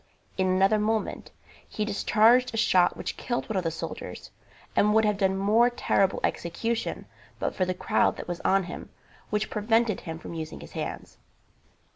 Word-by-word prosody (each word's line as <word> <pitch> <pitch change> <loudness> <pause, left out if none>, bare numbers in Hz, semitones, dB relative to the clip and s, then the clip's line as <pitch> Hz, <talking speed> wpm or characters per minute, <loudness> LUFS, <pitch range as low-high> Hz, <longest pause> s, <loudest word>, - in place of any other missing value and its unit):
In 190 0 +1
another 195 +3 +3
moment 220 +1 -1 0.4
he 210 - -2
discharged 225 +4 +3
a - - -2
shot 185 -5 +3
which - - -5
killed 240 -1 -3
one 220 - -4
of 185 - 0
the 165 - 0
soldiers, 160 - -7 0.4
and 210 +1 +3
would 220 0 +5
have 210 -1 +1
done 190 -1 +2
more 215 +5 +4
terrible 195 -5 +1
execution 225 +7 -2 0.3
but - - -2
for 185 - 0
the 185 0 -2
crowd - - +1
that - - -7
was 175 -1 -4
on 195 0 +3
him, 175 0 -8 0.4
which 210 0 -1
prevented 225 0 +1
him 160 -2 -6
from 170 - -9
using 160 - -6
his 75 - -11
hands. - - -6
205 Hz, 175 wpm, -27 LUFS, 185-220 Hz, 0.4 s, would